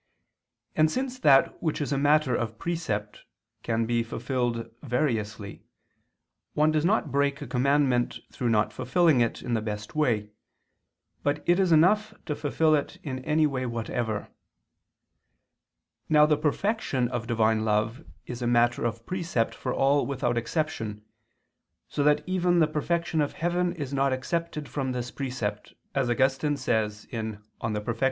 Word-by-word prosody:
And 155 0 +4
since 255 +4 -3
that 145 - +4
which 160 -3 -1
is 145 -1 -1
a - - +1
matter 145 -2 +3
of 115 -2 -3
precept 110 -12 -3 0.4
can 115 0 0
be 120 0 +1
fulfilled 120 0 -2
variously, 110 -7 -2 0.9
one 155 +1 +4
does 155 -1 +1
not 200 +6 +1
break 140 +1 +1
a 145 - -6
commandment 130 0 +2
through 125 - -2
not 105 -1 +2
fulfilling 130 +3 +3
it 115 - -1
in 120 - -2
the 110 - +1
best 105 -1 -5
way, 110 -9 +1 0.9
but 145 +1 -1
it 175 +2 +4
is 185 -3 +3
enough 210 +7 +4
to 150 - -2
fulfil 155 +2 +2
it 145 -2 0
in 130 -3 -4
any 155 0 +3
way 130 -3 -1
whatever. 115 -2 -3 1.8
Now 150 -1 +6
the 150 0 +3
perfection 150 - 0
of 120 -2 -4
Divine 110 -2 +2
love 110 +6 0 0.2
is 120 0 -7
a 120 - 0
matter 120 0 +3
of 115 0 -3
precept 170 -10 -1
for - - -4
all 140 +1 +2
without 130 -3 -1
exception, 120 -4 -2 0.8
so 145 - -1
that 150 0 +3
even 180 -1 +1
the 165 - +5
perfection 160 +1 0
of 145 - -1
heaven 175 +1 0
is 145 -5 -5
not 135 -1 +2
excepted 150 +2 -3
from 130 -3 -2
this 125 -1 -4
precept, 115 -7 -4 0.2
as 135 -3 0
Augustine 135 +4 +1
says 105 -4 -1
(De 115 - -5 0.2
Perf. - - -23 0.2
Justit. 110 +1 -2
135 Hz, 155 wpm, -27 LUFS, 115-155 Hz, 1.8 s, Now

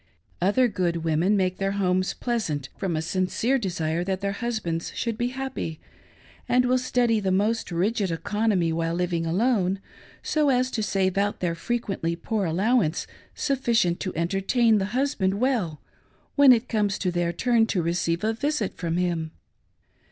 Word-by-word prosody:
Other 205 +8 +3
good 175 -6 -1
women 165 +6 +2
make 185 -1 0
their 195 0 -1
hpmes 185 -1 0
pleasant 175 - -2
from 190 -5 -2
a 155 - -1
sin 185 +3 0
pere 255 +8 +1
desire 170 -5 -1
that 190 0 -2
their 200 0 -1
husbands 200 -7 -3
should 230 -2 -2
be 240 +2 -1
happy, 260 -11 -4 0.7
and 250 0 +4
wil} 255 +1 +3
study, 245 -3 +1
the 195 -2 -1
most 210 +4 +1
rigid 195 +4 0
economy 185 0 0
while 165 0 -1
living 170 -2 -1
alone, 195 0 +1 0.4
so 300 -2 +2
as 255 0 +2
to 220 - -2
save 195 -2 0
out 205 +1 +1
of - - -33
their 175 -2 0
frequently 190 -3 -2
poor 210 +3 -2
allowance 190 0 +1 0.3
sufficient 235 -10 +1
to 185 - -4
entertain 195 +7 +2
the 190 - 0
husband 210 -9 +1
well 210 - 0 0.5
when 280 -2 +7
it 235 0 +3
comes 205 -3 0
to 185 - -1
their 175 -1 0
turn 230 +4 +2
to 185 -6 0
receive 170 +1 -1
a 220 +1 +1
visit 265 -3 -1
from 170 -1 -2
him. 170 -3 -1
195 Hz, 165 wpm, -25 LUFS, 175-235 Hz, 0.7 s, when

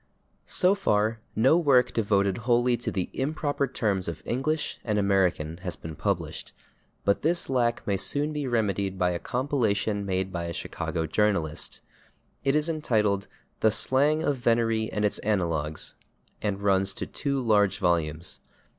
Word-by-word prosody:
So 185 +1 +4
far 110 - +1 0.2
no 135 +9 +4
work 130 -6 +4
devoted 100 -3 +1
wholly 120 +1 +2
to 120 - -3
the 95 -3 -2
improper 145 0 -1
terms 100 -7 -1
of 85 -2 -5
English 145 +5 -1
and 105 -3 0
American 95 -6 +1
has 90 0 -5
been 80 -1 -8
published, - - -3 0.5
but 100 - +2
this 170 -2 0
lack 120 -2 +1
may 100 - 0
be - - +1
soon 145 +3 -1
remedied 100 -4 0
by 90 -1 +2
a 85 - -2
compilation 110 -6 0
made 95 -1 -2
by 85 -1 -3
a 85 - -4
Chicago 80 0 -3
journalist. 80 -3 0 0.6
It 135 +1 +2
is 150 +1 +2
entitled 110 -11 0 0.3
"The 110 - +4
Slang 145 +8 +2
of 145 -3 +1
Venery 115 -2 +1
and 105 0 0
Its 105 - +1
Analogues," 85 -7 -1 0.5
and 100 -1 -2
runs 95 -1 +2
to - - -4
two 140 -1 -2
large 105 -5 +3
volumes. 85 -3 0
105 Hz, 155 wpm, -27 LUFS, 95-130 Hz, 0.6 s, So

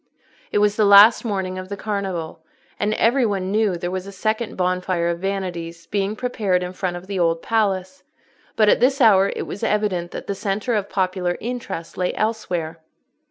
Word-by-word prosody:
It - - +1
was 205 0 +2
the 215 - +3
last 205 +3 +8
morning 190 -4 -3
of 185 0 -8
the 200 - -5
Carnival, 190 -7 -4 0.4
and 210 +1 0
every 245 +3 +3
one 195 -4 -1
knew 210 -4 +1
there 175 +1 -4
was 185 +1 -4
a - - -7
second 215 +3 -2
Bonfire 180 -1 0
of 170 0 -2
Vanities 175 -3 -4
being 200 +1 -1
prepared 210 -7 0
in 180 0 -5
front 185 -2 -3
of 175 - -10
the 195 -1 -4
Old 165 -1 +1
Palace; 210 +2 -1 0.5
but 215 - +4
at - - +5
this 265 +3 +3
hour 200 -5 +5
it - - -4
was 200 - -7
evident 200 -5 0
that - - -7
the 200 - -2
centre 200 +5 -2
of 205 -2 -1
popular 185 -2 -1
interest 230 -9 -6
lay 180 - 0
elsewhere. 175 -7 -2
195 Hz, 190 wpm, -22 LUFS, 180-215 Hz, 0.5 s, last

